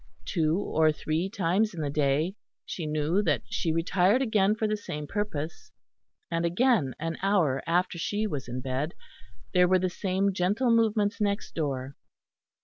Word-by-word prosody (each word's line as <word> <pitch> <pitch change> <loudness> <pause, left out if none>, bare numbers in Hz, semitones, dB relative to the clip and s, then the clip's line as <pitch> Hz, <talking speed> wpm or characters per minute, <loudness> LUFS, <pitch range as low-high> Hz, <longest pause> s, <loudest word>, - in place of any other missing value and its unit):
Two 160 -2 +1
or 160 -5 +2
three 155 +4 -2
times 195 +2 0
in 165 - -4
the 145 -2 -2
day 150 +5 +1 0.3
she 165 -4 -5
knew 155 +5 +1
that 150 - +1
she 165 - 0
retired 180 +7 +2
again 215 -5 +2
for 220 0 0
the 215 - 0
same 150 -8 -6
purpose, 170 -4 -4 0.6
and 165 0 0
again 175 - +2
an 165 +1 -3
hour 180 -9 +2
after 175 +1 +1
she 210 +5 -1
was 145 - -4
in 125 +1 -4
bed, 135 +5 -3 0.6
there 180 -1 +5
were 185 +1 +4
the 185 0 -1
same 195 +1 0
gentle 205 +7 +1
movements 220 -2 +2
next 200 -1 -1
door. 140 -4 -3
180 Hz, 160 wpm, -28 LUFS, 155-205 Hz, 0.6 s, there